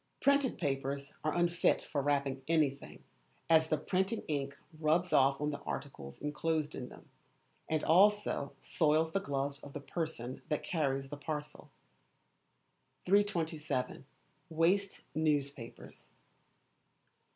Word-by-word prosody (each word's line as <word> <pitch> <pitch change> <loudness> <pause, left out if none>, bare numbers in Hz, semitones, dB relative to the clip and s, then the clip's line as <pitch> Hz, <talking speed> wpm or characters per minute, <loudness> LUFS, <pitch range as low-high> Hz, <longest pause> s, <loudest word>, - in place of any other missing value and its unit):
Printed 280 -2 +3
papers 140 -2 -2
are 155 - 0
unfit 175 0 +2
for 145 - -2
wrapping 140 -1 0
anything, 150 -4 0 0.5
as 160 -1 +5
the 155 - +2
printing 190 +7 0
ink 140 -2 -2 0.2
rubs 165 +3 +2
off 135 0 +5
on 150 0 0
the 145 - -5
articles 70 - -6
enclosed 155 0 -1
in 125 -1 -6
them, - - -14 0.6
and 155 -1 0
also 200 -4 +4
soils 160 +1 +2
the 195 - +1
gloves 140 -4 -2
of 145 - -11
the 145 - -4
person 145 -5 -4
that 150 - -1
carries 135 -5 -1
the 145 - -6
parcel. 150 0 -5 1.4
327. 160 -10 0 0.4
Waste 180 +5 +1
Newspapers. 145 -6 -2
150 Hz, 120 wpm, -33 LUFS, 140-165 Hz, 1.4 s, as